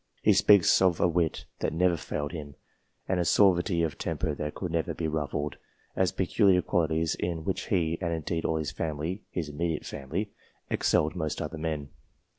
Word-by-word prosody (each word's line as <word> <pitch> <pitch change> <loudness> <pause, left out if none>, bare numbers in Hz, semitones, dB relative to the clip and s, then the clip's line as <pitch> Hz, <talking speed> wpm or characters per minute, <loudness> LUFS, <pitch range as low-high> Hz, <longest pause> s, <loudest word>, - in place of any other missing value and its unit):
He - - +6
speaks 100 -4 +6
of 90 -3 +3
a - - +4
wit 85 -2 0
that - - -1
never 90 +1 +3
failed 75 -2 -4
him, 75 -4 -7 0.5
and 95 -1 +1
a - - +2
suavity 90 -2 +3
of 80 -4 -2
temper 75 - -2
that 75 +1 -4
could 90 -3 -4
never 80 -1 -1
be 80 - -2
ruffled, 75 -1 -2 0.4
as 95 -1 +2
peculiar 95 -1 +3
qualities 80 -1 +1
in 85 -2 -3
which - - -2
he, 85 -2 +1
and 85 -2 -1
indeed 80 0 -2
all 80 - 0
his 75 -4 -2
family 80 +6 -3
(his 85 -4 -3
immediate 80 +1 -2
family), 85 +10 -4 0.4
excelled 75 - +2
most 80 -1 -2
other 80 - -4
men. 75 -3 -3
80 Hz, 180 wpm, -28 LUFS, 75-90 Hz, 0.5 s, He